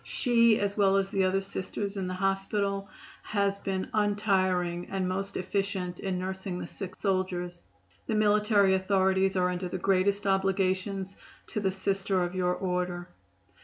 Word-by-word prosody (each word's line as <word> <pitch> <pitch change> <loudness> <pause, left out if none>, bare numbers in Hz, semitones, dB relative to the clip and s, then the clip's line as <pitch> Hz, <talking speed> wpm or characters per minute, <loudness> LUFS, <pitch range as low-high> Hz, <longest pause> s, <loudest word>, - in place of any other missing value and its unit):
She, 235 -3 +3
as 200 0 -1
well 195 -2 +4
as 195 0 +1
the 195 -1 +2
other 190 +1 +1
Sisters 195 +1 -4
at 190 -2 -2
the 185 - -3
hospital, 195 +1 -1 0.3
has 200 -1 0
been 190 -1 -2
untiring 190 -4 +1
and 190 -1 -1
most 195 +2 -3
efficient 190 -1 -2
in 190 -2 -2
nursing 190 0 -4
the - - -5
sick 190 -2 -7
soldiers. 180 -3 -1 0.5
The 220 - 0
military 210 -2 +4
authorities 190 0 +2
are 180 -1 +2
under 180 0 -3
the 185 - -3
greatest 195 +2 +1
obligations 195 0 0 0.3
to - - -2
the 195 -2 +1
Sisters 190 -1 0
of - - -13
your 180 -1 +1
Order." 180 -1 -2
195 Hz, 155 wpm, -29 LUFS, 185-200 Hz, 0.5 s, well